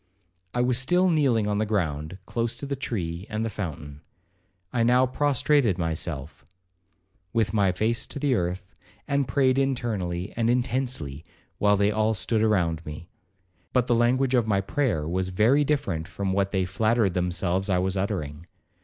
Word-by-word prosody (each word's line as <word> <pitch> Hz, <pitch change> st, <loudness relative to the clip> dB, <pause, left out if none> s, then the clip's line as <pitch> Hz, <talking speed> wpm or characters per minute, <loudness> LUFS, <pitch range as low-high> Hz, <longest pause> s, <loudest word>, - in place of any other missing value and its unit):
I 120 Hz, -, +2 dB
was 125 Hz, 0 st, +2 dB
still 180 Hz, +7 st, +3 dB
kneeling 130 Hz, -9 st, +2 dB
on 105 Hz, 0 st, 0 dB
the 110 Hz, -, +1 dB
ground, 80 Hz, -5 st, -2 dB
close 115 Hz, 0 st, -2 dB
to -, -, -5 dB
the 140 Hz, 0 st, -2 dB
tree 90 Hz, -8 st, -4 dB
and 110 Hz, 0 st, -2 dB
the 115 Hz, -, -3 dB
fountain. 75 Hz, -7 st, -6 dB, 0.7 s
I 120 Hz, -, +1 dB
now 125 Hz, +2 st, +4 dB
prostrated 140 Hz, -, +2 dB
myself, 80 Hz, -3 st, -3 dB, 0.9 s
with 110 Hz, -4 st, +1 dB
my 100 Hz, -3 st, +3 dB
face 110 Hz, +5 st, 0 dB
to -, -, -7 dB
the 140 Hz, -1 st, +1 dB
earth, 90 Hz, -2 st, -2 dB, 0.3 s
and 140 Hz, -2 st, +1 dB
prayed 130 Hz, 0 st, +2 dB
internally 105 Hz, -9 st, -2 dB
and 115 Hz, 0 st, +1 dB
intensely, 120 Hz, -, -1 dB, 0.4 s
while 105 Hz, 0 st, +4 dB
they 100 Hz, +1 st, +3 dB
all 110 Hz, +1 st, +1 dB
stood 110 Hz, +2 st, 0 dB
around 85 Hz, -7 st, +1 dB
me; 75 Hz, +3 st, -9 dB, 0.6 s
but 125 Hz, -2 st, +3 dB
the 120 Hz, -, +1 dB
language 125 Hz, +3 st, +2 dB
of 120 Hz, -3 st, +3 dB
my 100 Hz, -3 st, +2 dB
prayer 100 Hz, -, -1 dB
was 90 Hz, +2 st, -1 dB
very 115 Hz, +10 st, +3 dB
different 95 Hz, -, -1 dB
from 95 Hz, +1 st, -3 dB
what 100 Hz, 0 st, 0 dB
they 95 Hz, -2 st, +1 dB
flattered 110 Hz, +1 st, +1 dB
themselves 90 Hz, +2 st, 0 dB
I 90 Hz, -, +3 dB
was 95 Hz, +1 st, 0 dB
uttering. 85 Hz, -5 st, -3 dB
105 Hz, 165 wpm, -26 LUFS, 90-125 Hz, 0.9 s, now